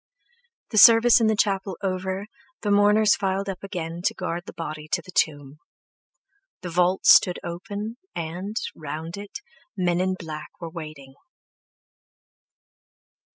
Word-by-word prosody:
The 215 Hz, -, +3 dB
service 230 Hz, +2 st, +8 dB
in 225 Hz, -, +4 dB
the 220 Hz, -, +2 dB
chapel 195 Hz, -2 st, 0 dB
over, 190 Hz, +1 st, -2 dB, 0.4 s
the 205 Hz, -, -1 dB
mourners 205 Hz, +1 st, +4 dB
filed 195 Hz, 0 st, -2 dB
up 195 Hz, -1 st, -6 dB
again 175 Hz, -4 st, -5 dB
to -, -, +1 dB
guard 175 Hz, -2 st, -3 dB
the -, -, -8 dB
body 155 Hz, -2 st, -6 dB
to -, -, +2 dB
the 185 Hz, -, -12 dB
tomb. 145 Hz, -4 st, -1 dB, 1.0 s
The 180 Hz, -1 st, -6 dB
vault 180 Hz, +2 st, +1 dB
stood 180 Hz, -, +6 dB
open, 205 Hz, +6 st, -6 dB, 0.2 s
and, 175 Hz, +5 st, -5 dB, 0.2 s
round 160 Hz, +2 st, -6 dB
it, 200 Hz, 0 st, -8 dB, 0.4 s
men 175 Hz, -1 st, +1 dB
in 185 Hz, 0 st, 0 dB
black 155 Hz, -4 st, -8 dB
were 165 Hz, -2 st, -7 dB
waiting. 155 Hz, -5 st, -9 dB
185 Hz, 135 wpm, -24 LUFS, 165-200 Hz, 1.0 s, service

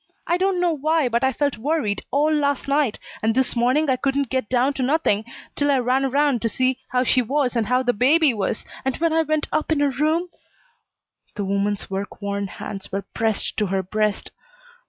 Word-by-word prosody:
I 345 Hz, -, +1 dB
don't 375 Hz, 0 st, +1 dB
know 350 Hz, -2 st, +2 dB
why, 310 Hz, -1 st, +1 dB
but 235 Hz, +2 st, 0 dB
I 265 Hz, -, +3 dB
felt 285 Hz, -5 st, -1 dB
worried 255 Hz, -6 st, -1 dB
all 300 Hz, +3 st, +2 dB
last 285 Hz, -2 st, 0 dB
night, 280 Hz, -5 st, +1 dB, 0.2 s
and 220 Hz, +1 st, +1 dB
this 260 Hz, -1 st, +1 dB
morning 255 Hz, +6 st, +2 dB
I 260 Hz, -2 st, +2 dB
couldn't 275 Hz, 0 st, -1 dB
get 260 Hz, -4 st, -1 dB
down 255 Hz, +3 st, +2 dB
to 270 Hz, -, -4 dB
nothing 255 Hz, -6 st, +1 dB, 0.3 s
'til 290 Hz, 0 st, +1 dB
I 280 Hz, -, +4 dB
ran 255 Hz, +2 st, +1 dB
around 275 Hz, -2 st, +1 dB
to 230 Hz, -, 0 dB
see 255 Hz, +3 st, 0 dB
how 250 Hz, 0 st, +1 dB
she 255 Hz, 0 st, +3 dB
was 260 Hz, +1 st, 0 dB
and 225 Hz, -3 st, 0 dB
how 250 Hz, +2 st, +2 dB
the 245 Hz, -1 st, +1 dB
baby 280 Hz, +5 st, +4 dB
was, 210 Hz, 0 st, -2 dB, 0.2 s
and 265 Hz, -1 st, -1 dB
when 330 Hz, -1 st, 0 dB
I 325 Hz, -, +3 dB
went 310 Hz, -1 st, -1 dB
up 310 Hz, -, -1 dB
in 310 Hz, -, +2 dB
her 285 Hz, -1 st, +2 dB
room 310 Hz, +6 st, 0 dB, 0.5 s
" -, -, -45 dB
The 205 Hz, -, -3 dB
woman's 200 Hz, +1 st, -1 dB
work 195 Hz, +1 st, -4 dB
worn 200 Hz, -1 st, -3 dB
hands 195 Hz, +1 st, -8 dB
were 195 Hz, 0 st, -3 dB
pressed 225 Hz, -2 st, -1 dB
to 210 Hz, -, +1 dB
her 190 Hz, 0 st, -1 dB
breast. 210 Hz, +2 st, -1 dB
260 Hz, 215 wpm, -22 LUFS, 220-295 Hz, 0.5 s, I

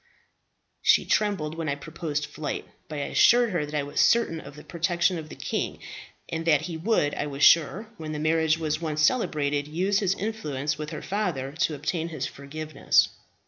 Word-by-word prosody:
"She -, -, +4 dB
trembled 200 Hz, -8 st, 0 dB
when 165 Hz, -1 st, -3 dB
I 140 Hz, -, 0 dB
proposed 150 Hz, 0 st, -4 dB
flight; 155 Hz, -2 st, -5 dB, 0.2 s
but 155 Hz, -, -6 dB
I 145 Hz, -, -1 dB
assured 240 Hz, +7 st, +4 dB
her 160 Hz, -5 st, -1 dB
that 150 Hz, -, -6 dB
I 145 Hz, -, 0 dB
was 145 Hz, -, 0 dB
certain 230 Hz, -9 st, +3 dB
of 140 Hz, -2 st, -11 dB
the 150 Hz, -, -11 dB
protection 170 Hz, +1 st, 0 dB
of 155 Hz, -1 st, -9 dB
the -, -, -9 dB
king, -, -, -3 dB, 0.5 s
and 160 Hz, 0 st, -3 dB
that 150 Hz, -3 st, +5 dB
he 165 Hz, +1 st, -5 dB
would, 160 Hz, -4 st, +1 dB
I 150 Hz, -, -2 dB
was 140 Hz, 0 st, -3 dB
sure, 170 Hz, +6 st, +5 dB
when 155 Hz, -1 st, -6 dB
the 155 Hz, -, -3 dB
marriage 160 Hz, +1 st, +2 dB
was 155 Hz, -1 st, -2 dB
once 155 Hz, -2 st, -1 dB
celebrated, 145 Hz, -, +1 dB
use 185 Hz, +6 st, +1 dB
his 195 Hz, -2 st, +1 dB
influence 155 Hz, -11 st, -3 dB
with 150 Hz, 0 st, -6 dB
her 155 Hz, -, -6 dB
father 175 Hz, -10 st, -2 dB
to 160 Hz, 0 st, 0 dB
obtain 160 Hz, +3 st, -2 dB
his 155 Hz, -5 st, -4 dB
forgiveness. 155 Hz, +3 st, 0 dB
155 Hz, 190 wpm, -26 LUFS, 150-175 Hz, 0.5 s, that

